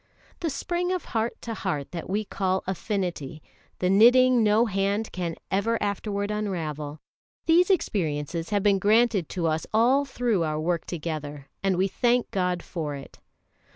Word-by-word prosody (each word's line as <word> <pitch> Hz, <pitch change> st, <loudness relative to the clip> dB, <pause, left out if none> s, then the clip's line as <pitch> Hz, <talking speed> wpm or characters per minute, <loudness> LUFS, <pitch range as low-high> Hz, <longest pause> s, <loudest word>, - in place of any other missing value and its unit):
The 335 Hz, -, -1 dB
spring 350 Hz, +5 st, -2 dB
of 365 Hz, -1 st, -2 dB
heart 225 Hz, 0 st, -2 dB
to 230 Hz, -, -4 dB
heart 150 Hz, -10 st, -3 dB
that 170 Hz, 0 st, -6 dB
we 210 Hz, +3 st, -1 dB
call 190 Hz, -1 st, -1 dB
affinity, 180 Hz, -, -3 dB, 0.3 s
the 180 Hz, -, 0 dB
knitting 245 Hz, +5 st, +6 dB
no 215 Hz, +2 st, +4 dB
hand 200 Hz, +1 st, -1 dB
can 175 Hz, -3 st, -3 dB, 0.2 s
ever 225 Hz, +4 st, +1 dB
afterward 205 Hz, 0 st, -2 dB
unravel 155 Hz, -8 st, -3 dB, 0.5 s
these 345 Hz, +3 st, +5 dB
experiences 165 Hz, -, -1 dB
have 205 Hz, -2 st, +1 dB
been 200 Hz, -2 st, +4 dB
granted 215 Hz, -3 st, +3 dB
to 175 Hz, -3 st, -2 dB
us 160 Hz, 0 st, 0 dB
all 245 Hz, +6 st, +4 dB
through 245 Hz, -8 st, 0 dB
our 155 Hz, -1 st, -1 dB
work 170 Hz, +1 st, -1 dB
together, 150 Hz, -4 st, -5 dB
and 195 Hz, -2 st, +1 dB
we 190 Hz, +2 st, +2 dB
thank 240 Hz, +5 st, +1 dB
God 180 Hz, -2 st, 0 dB
for 150 Hz, -4 st, -4 dB
it. 140 Hz, -, -11 dB
195 Hz, 155 wpm, -26 LUFS, 165-225 Hz, 0.5 s, knitting